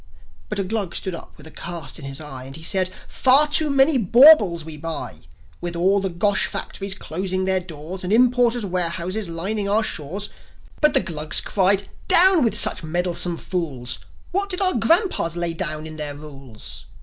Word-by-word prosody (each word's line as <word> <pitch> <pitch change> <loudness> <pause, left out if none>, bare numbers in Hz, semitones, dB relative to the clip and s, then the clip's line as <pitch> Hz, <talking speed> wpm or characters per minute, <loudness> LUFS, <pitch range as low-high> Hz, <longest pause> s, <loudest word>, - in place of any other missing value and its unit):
But 210 - -4
a 200 - 0
Glug 200 -2 -4
stood 190 - -3
up 170 - -9
with 150 - -15
a 160 - -11
cast 170 -4 -7
in 140 - -9
his 135 0 -5
eye, 135 -4 -8
And 135 +1 -10
he 160 - -9
said, 185 +2 +1 0.2
"Far 270 +3 +4
too 300 +1 +3
many 275 0 +3
baubles 220 - +6
we 160 -1 -6
buy; 160 +2 -6 0.4
With 175 0 -4
all 190 +4 +2
the 190 -1 -2
Gosh 200 +4 +1
factories 195 -1 -4
closing 185 +1 -3
their 190 0 +1
doors, 175 +1 -9
And 180 - -3
importers' 245 0 +3
warehouses 180 +2 -1
lining 200 +5 -3
our 215 +2 +2
shores." 190 +3 -4 0.5
But 300 -1 +4
the 270 - +4
Glugs 155 -2 -1
cried, 195 0 +1 0.2
"Down 365 -3 +7
with 230 - +1
such - - +4
meddlesome 175 +1 0
fools! 135 -11 -4 0.3
What 395 +2 -1
did 365 -1 -1
our 375 -2 +3
grandpas 235 - +1
lay 170 -1 -1
down 155 -2 -3
in 155 0 -9
their 150 -2 -5
rules?" 135 -7 -10
185 Hz, 185 wpm, -21 LUFS, 160-220 Hz, 0.5 s, Down